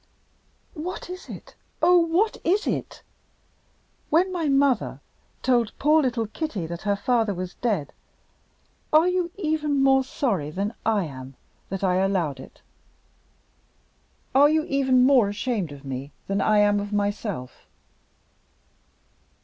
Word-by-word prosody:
"What 355 +2 -6
is 365 +1 -9
it? - - -10 0.3
Oh, 360 - +5
what 345 +6 +1
is 390 +5 +1
it! - - -4 1.1
When 365 +4 +2
my 330 -4 -1
mother 275 -4 +2 0.4
told 240 -4 +1
poor 305 +2 +4
little 240 -4 0
Kitty 215 - -4
that 170 +1 -6
her 205 -1 0
father 225 -2 0
was 180 +1 -5
dead, 200 - -2 1.0
are 315 +3 +5
you 360 -1 0
even 305 -5 0
more 270 0 +4
sorry 210 - -2
than 200 +7 -3
I 215 -3 +2
am 130 -4 -9 0.3
that 195 0 -4
I 185 -1 +2
allowed 185 -8 0
it? - - -13 1.7
Are 285 +2 +6
you 310 0 +2
even 265 -3 +3
more 255 -6 +5
ashamed 205 - -2
of 140 -1 -11
me 135 +1 -5
than 195 0 -1
I 215 +1 +3
am 205 0 +4
of 205 0 -5
myself?" 205 - -3
230 Hz, 135 wpm, -24 LUFS, 195-300 Hz, 1.7 s, Are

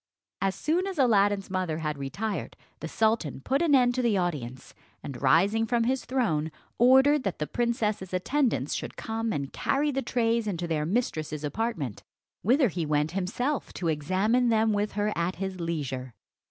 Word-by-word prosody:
As 195 0 +1
soon 345 +5 0
as 385 -3 -5
Aladdin's 205 -6 +3
mother 185 -4 -1
had 155 -2 -2
retired, 195 +10 -4 0.2
the 160 - -5
sultan 220 - 0
put 270 - 0
an 320 -4 +4
end 245 -2 +4
to 255 - 0
the 230 -5 +2
audience; 135 -9 -3 0.3
and 130 -4 -7
rising 200 +11 +3
from 235 +1 +1
his 260 +2 0
throne 160 - 0 0.3
ordered 265 +4 +6
that 195 -6 -3
the 150 - -2
princess's 215 -3 -1
attendants 245 +8 0
should - - -5
come 225 0 -2
and 140 -7 -3
carry 290 +2 0
the 270 0 -1
trays 230 -2 0
into 175 -4 -2
their 155 -2 -1
mistress's 155 -8 -2
apartment, 150 - -3 0.4
whither 255 +4 +3
he 175 -1 -3
went 150 0 0
himself 215 +10 -2
to 170 - -2
examine 190 +11 +1
them 220 -1 +3
with 205 0 -1
her 210 +1 0
at 170 +2 -1
his 190 0 -4
leisure. 135 -7 -4
205 Hz, 170 wpm, -27 LUFS, 160-240 Hz, 0.4 s, ordered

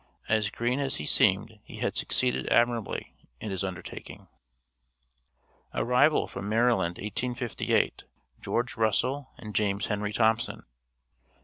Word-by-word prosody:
As 110 -2 +2
green 120 +5 -1
as 135 -2 -1
he 75 - -4
seemed - - +2
he - - -11
had - - -1
succeeded 65 +1 +1
admirably 120 -2 +1 0.3
in 105 - -5
his 95 0 -2
undertaking. 95 -2 -7 1.5
ARRIVAL 125 +5 +4
FROM 100 +1 -6
MARYLAND, 110 -6 +2
1858. 120 +3 -1 0.4
GEORGE - - -1
RUSSELL 125 +6 +1
AND 105 -2 -8
JAMES 100 -1 +1
HENRY 105 0 -2
THOMPSON. 110 +2 +1
110 Hz, 115 wpm, -28 LUFS, 100-120 Hz, 1.5 s, ARRIVAL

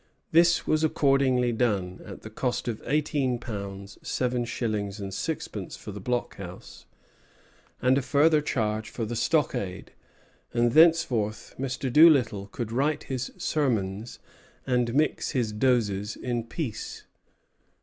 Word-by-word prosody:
This 170 +1 +4
was 155 0 +1
accordingly 135 -5 +3
done, 100 -6 -1
at - - -10
the - - -9
cost 125 -1 -2
of 115 -3 -3
eighteen 145 -2 +1
pounds, 100 -4 -7
seven 125 -1 -1
shillings, 105 -4 -3
and 100 -1 -5
sixpence - - -4
for - - -8
the 100 - -7
blockhouse, 100 -6 -5 1.0
and 130 +2 +4
a - - -2
farther 150 +4 +4
charge 110 -6 -1
for 115 - -4
the 120 +2 -4
stockade; 120 - -1 0.6
and 120 0 +3
thenceforth 135 -10 +3
Mr. 130 -1 -3
Doolittle 130 -11 +5
could 115 +2 -5
write 145 +5 0
his 130 -1 -4
sermons 115 -7 -1 0.5
and 125 -2 +1
mix 150 +1 +1
his 120 -5 0
doses 105 -3 +1
in 120 -2 -3
peace. 120 -1 -5
120 Hz, 130 wpm, -27 LUFS, 105-135 Hz, 1.0 s, Doolittle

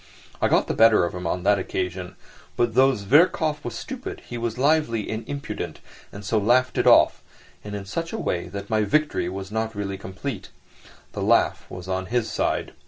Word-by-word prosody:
I - - +4
got - - +3
the - - -2
better 110 -4 +5
of 85 - -4
him 90 -1 -4
on 90 +1 -2
that 100 0 +4
occasion, 90 -1 -4 0.4
but 120 -1 +1
though 130 +2 +5
Zverkov 150 - +3
was 120 -2 -5
stupid 260 - -7
he 120 - -6
was 115 -1 -3
lively 135 -6 +2
and 110 +1 -3
impudent, 140 0 -5 0.3
and 105 +1 -9
so 110 +1 +1
laughed 125 +5 +2
it - - +2
off, - - +6 0.4
and 105 0 -6
in 100 -1 -6
such 165 - -4
a 225 - -3
way 85 - -2
that 100 +2 -7
my 110 0 +1
victory 125 - +1
was 95 +1 -6
not 110 0 -2
really 100 -1 -4
complete; 95 -1 -6 0.6
the - - -4
laugh - - +2
was 90 0 -8
on 95 0 -2
his 120 +1 -1
side. - - -1
110 Hz, 195 wpm, -24 LUFS, 95-130 Hz, 0.6 s, off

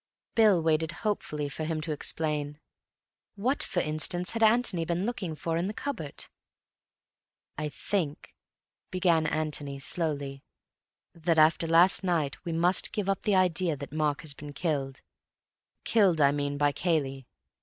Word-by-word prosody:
Bill 210 -7 +4
waited 160 +1 +1
hopefully 150 -8 -1
for 145 +3 -5
him 160 0 -2
to 160 0 -4
explain. 150 -1 -3 0.8
What, 245 +8 0
for 175 - 0
instance, 155 +4 0
had 230 - -3
Antony 220 -6 +3
been 170 +3 -1
looking 195 -9 -3
for 165 +1 -2
in 175 +2 -1
the 210 - -5
cupboard? 230 - -4 1.3
"I 150 0 -3
think," 150 0 -3 0.6
began 170 -4 +2
Antony 150 -3 -2
slowly, 140 -2 -3 0.7
"that 165 0 0
after 160 +1 +4
last 170 +4 +6
night 165 -6 -1
we 170 - -4
must 175 +3 +3
give 210 -3 -2
up 195 -1 0
the 210 -3 +1
idea 180 -3 +2
that 140 0 -8
Mark 150 -2 0
has 155 -3 -4
been 145 +1 -9
killed; 140 -5 -2 0.8
killed, 195 -7 +3
I 140 -1 +5
mean, 145 0 -2
by 145 0 +3
Cayley. 140 -6 -1
160 Hz, 145 wpm, -28 LUFS, 150-180 Hz, 1.3 s, last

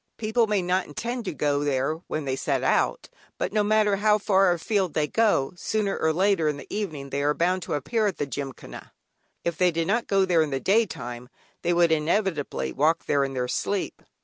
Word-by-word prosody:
People 220 +1 +1
may 205 -3 +1
not 180 +1 0
intend 235 - -4
to - - -2
go 145 -1 0
there 140 +2 0
when 155 -2 -3
they 130 -1 -1
set - - -1
out, - - +1 0.3
but - - -2
no 210 -1 +2
matter 210 -1 +3
how 210 +1 +3
far 195 -2 +3
afield 180 0 -1
they 155 - +2
go, 205 -8 +1
sooner 200 +2 -1
or 160 - +1
later 185 -1 +2
in 150 -1 0
the - - -9
evening 155 -10 -4
they 140 - -1
are 145 +1 +1
bound 180 +2 +1
to - - -3
appear 215 - 0
at 195 - -3
the - - -1
Gymkhana. 135 -1 -8 0.5
If 170 -1 -2
they 180 -1 +5
did 165 -1 -1
not 230 +6 0
go 195 -1 +3
there 175 -3 +3
in 155 - 0
the 135 -1 -2
daytime 125 - -1 0.3
they 175 - 0
would 170 -1 +3
inevitably 155 - 0
walk 155 +4 +1
there 140 -1 +2
in 135 -1 -3
their 125 -1 -1
sleep. 200 +9 -2
170 Hz, 210 wpm, -25 LUFS, 145-205 Hz, 0.5 s, they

